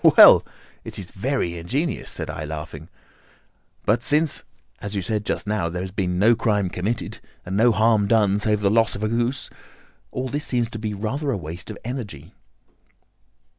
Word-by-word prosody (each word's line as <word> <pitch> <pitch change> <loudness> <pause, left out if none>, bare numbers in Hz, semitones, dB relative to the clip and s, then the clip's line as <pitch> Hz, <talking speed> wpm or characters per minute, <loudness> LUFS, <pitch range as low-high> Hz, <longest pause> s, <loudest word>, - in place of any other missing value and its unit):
"Well, - - +10 0.4
it - - -8
is 95 -2 -8
very 100 -6 -1
ingenious," 140 - -2
said - - -4
I, 75 - -5
laughing; 80 +1 -7 1.0
"but 110 +3 +3
since, 150 +1 +2 0.4
as 100 0 -5
you 100 - -1
said 105 +3 -1
just - - -1
now, 105 -5 0
there 90 +2 -3
has 95 - -6
been 90 -2 -1
no 110 +5 +5
crime 105 -4 +1
committed, 100 +7 -3 0.3
and 95 - -3
no 115 +4 +5
harm 110 -2 +3
done 105 -2 +3
save 105 0 +1
the 100 -1 +3
loss 115 -1 +3
of 100 - -5
a - - +2
goose, 120 +4 -1 0.6
all 130 +1 -3
this 145 +3 -2
seems 120 -2 0
to 110 - -6
be 105 -1 -3
rather 130 +9 -2
a 125 - +1
waste 85 +3 -7
of 110 - -6
energy." 115 - -6
105 Hz, 180 wpm, -23 LUFS, 95-120 Hz, 1.0 s, Well